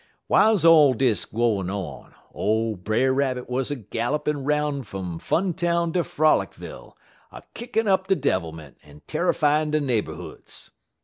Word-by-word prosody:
"Wiles 215 -6 +4
all 150 -5 +7
dis 120 -3 +1
gwine 110 -5 -1
on, 95 -7 -7 0.2
ole 110 +1 0
Brer 110 +8 0
Rabbit 130 -2 -1
wuz 125 +1 -1
a 145 - -2
gallopin' 135 +6 -3
'roun' 150 0 0
fum 95 -7 -6
Funtown 170 - 0
ter 180 - +2
Frolicville, 155 -2 -1 0.4
a - - -11
kickin' 230 -2 -2
up 190 -1 +2
de 195 - +3
devilment 80 - -3
en 75 0 -17
terrifyin' 150 +1 +1
de 155 0 +1
neighborhoods. 125 -7 -5
135 Hz, 135 wpm, -24 LUFS, 110-155 Hz, 0.4 s, all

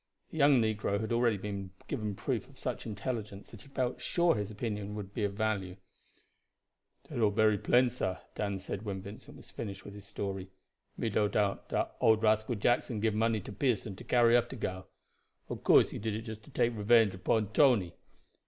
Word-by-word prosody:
The - - -7
young 140 -2 +6
negro 105 -2 0
had 110 +1 -2
already 115 -2 +3 0.5
given 105 -2 -3
proof - - -3
of - - -18
such - - -4
intelligence 105 -2 -5
that 115 - -11
he - - -14
felt 130 -2 -2
sure 170 -1 +3
his 105 -1 -3
opinion 105 -1 -4
would 100 -1 -7
be 110 - -2
of 100 -1 0
value. 100 -4 -1 1.3
"Dat - - -5
all 110 -2 +4
bery 105 0 +3
plain, 125 +1 +4
sah," 95 -7 -2 0.2
Dan 100 -2 -2
said 95 +1 -5
when 100 -3 -5
Vincent 100 +2 -11
finished 100 -4 -6
his 100 0 -10
story. 95 -2 -4 0.5
"Me 115 - -1
no 105 0 +2
doubt 100 -1 0
dat - - -1
old 110 0 +4
rascal 110 +2 +2
Jackson 120 +1 +1
give 110 0 +1
money 110 0 +1
to - - -8
Pearson 110 -4 -1
to - - -11
carry 120 -1 +4
off 120 0 +3
de 135 - -6
gal. 95 -5 -4 0.6
Ob - - -5
course - - +6
he - - -5
did 110 0 -2
it 110 - -4
just 110 -2 -7
to - - -15
take 120 0 +1
revenge 110 -1 +4
upon 105 +2 0
Tony. 120 - +4
110 Hz, 190 wpm, -31 LUFS, 100-115 Hz, 1.3 s, young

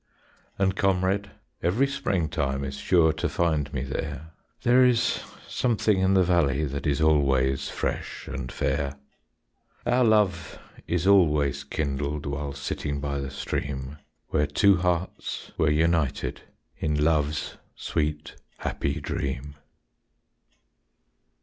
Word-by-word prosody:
And 95 -1 +1
comrade, 95 +1 +1 0.3
every 100 +11 +2
springtime 80 - -1
Is 70 0 -4
sure 80 -3 +4
to - - -2
find 80 -4 0
me 70 -2 -2
there; 75 +4 -5 0.3
There 125 +2 +6
is 125 -1 +3 0.3
something 110 -4 +1
in 95 +1 +3
the 95 - +5
valley 80 -5 +2
That 70 +2 -4
is 70 0 +1
always 70 -4 +2
fresh - - -4
and 65 -1 -5
fair. 70 0 -1 0.9
Our 120 +1 +3
love 105 -7 +2 0.3
is 85 0 0
always 75 -8 +4
kindled 70 0 -2
While 70 0 -3
sitting 70 +1 -3
by 70 0 -2
the 70 0 -4
stream, 70 +1 -4 0.3
Where 75 -1 +1
two 100 +6 +4
hearts 90 0 -2
were 80 - +2
united 80 -2 +1 0.4
In 75 -1 0
love's 75 -1 0 0.2
sweet 75 -1 -2 0.2
happy 70 - -2
dream. 70 +1 -4
75 Hz, 120 wpm, -26 LUFS, 70-95 Hz, 0.9 s, There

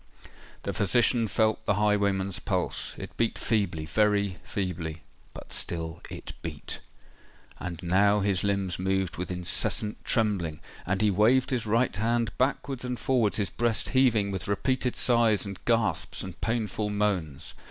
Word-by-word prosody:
The - - -2
physician 120 +2 +3
felt 110 +1 +1
the 100 - +3
highwayman's 100 -2 +1
pulse: - - -2
it - - -8
beat 115 - +1
feebly—very 100 0 +1
feebly—but 85 -4 -6
still 85 0 -1
it - - -8
beat! 75 -3 -5 0.8
And 90 -3 -5
now 100 +4 +3
his 95 -2 +1
limbs 100 -3 0
moved 95 -1 -1
with 90 - -4
incessant 90 +4 0
trembling,—and 95 -3 -1
he 105 - +4
waved 120 +7 +3
his 120 -4 -1
right 115 +1 +2
hand 115 +1 0
backwards 135 0 0
and 125 -2 -3
forwards, 120 -6 +1
his 100 -6 0
breast 115 +6 0
heaving 115 -7 +3
with 95 -4 -4
repeated 125 +5 0
sighs, 115 -4 +3
and 100 -2 -7
gasps, 115 -7 +1
and 95 -2 -9
painful 110 -2 -1
moans. 100 -9 -1
100 Hz, 135 wpm, -28 LUFS, 90-115 Hz, 0.8 s, he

